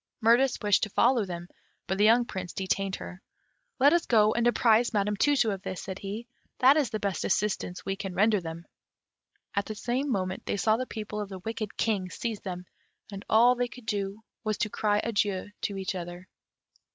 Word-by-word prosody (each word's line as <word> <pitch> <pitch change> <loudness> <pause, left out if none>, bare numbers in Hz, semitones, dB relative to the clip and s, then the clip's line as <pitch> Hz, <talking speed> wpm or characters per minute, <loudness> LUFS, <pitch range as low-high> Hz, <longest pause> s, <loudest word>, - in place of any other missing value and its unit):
Mirtis 240 +3 +4
wished 205 -2 +4
to 215 - -1
follow 235 +1 +3
them, 175 -2 -6 0.4
but 190 +1 -2
the - - +4
young 235 +2 +5
Prince 185 -5 -6
detained 195 0 -1
her. 185 +1 -9 0.6
"Let 280 +3 +5
us 345 -1 +2
go 215 -2 +4
and 235 0 +2
apprise 235 0 +3
Madame 210 0 +1
Tu 290 +8 +3
tu 235 -5 +2
of 195 -2 -4
this," 190 -2 -5
said 190 0 -6
he; 205 +4 -5 0.3
"that 265 +2 +6
is 295 -6 +2
the 215 - -3
best 200 -5 -2
assistance 190 -3 -1
we 195 - -1
can 195 -3 -6
render 210 +1 +3
them." 165 0 -7 0.9
At 200 -1 0
the 215 - -5
same 250 +6 -1
moment 185 -4 -2
they - - -1
saw 215 +2 +3
the 255 +2 -3
people 210 -1 -5
of 205 - -5
the 190 - -6
wicked 215 +2 -5
King 200 -5 0
seize 225 +1 -4
them, 180 -2 -6 0.5
and 200 0 -7
all 235 +3 +6
they 245 0 -1
could 250 -2 -13
do 200 +1 -3 0.2
was 215 -2 -1
to 210 - -1
cry 210 -1 +1
adieu 205 -3 -1
to 200 -2 -3
each 190 0 -2
other. 175 0 -7
210 Hz, 205 wpm, -28 LUFS, 190-230 Hz, 0.9 s, that